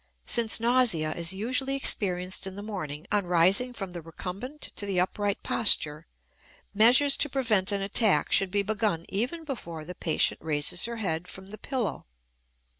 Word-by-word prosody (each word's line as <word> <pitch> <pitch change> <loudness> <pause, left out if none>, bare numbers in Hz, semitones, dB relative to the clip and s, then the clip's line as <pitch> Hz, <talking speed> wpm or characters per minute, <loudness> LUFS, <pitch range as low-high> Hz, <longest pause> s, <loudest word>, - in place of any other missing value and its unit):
Since 230 -2 +2
nausea 230 -10 +2
is 170 +2 -1
usually 255 +7 -1
experienced 185 -8 +1
in 190 - -7
the 205 - -7
morning 160 -7 -6
on 205 -3 +1
rising 185 +8 +3
from 195 -6 -7
the 175 -1 -7
recumbent 195 - -6
to 205 - -4
the 190 -2 0
upright 200 +2 -1
posture, 155 -8 0 0.7
measures 250 +7 +6
to 295 - 0
prevent 225 -8 +1
an 200 -1 -1
attack 205 +1 +2
should 195 - +3
be 200 +1 0
begun 205 -5 -1
even 250 - -2
before 170 - -7
the 180 - -7
patient 165 -2 0
raises 155 +2 -1
her 235 0 -4
head 180 -5 -2
from 190 - -10
the 205 +3 -8
pillow. 255 - -3
200 Hz, 165 wpm, -27 LUFS, 175-235 Hz, 0.7 s, measures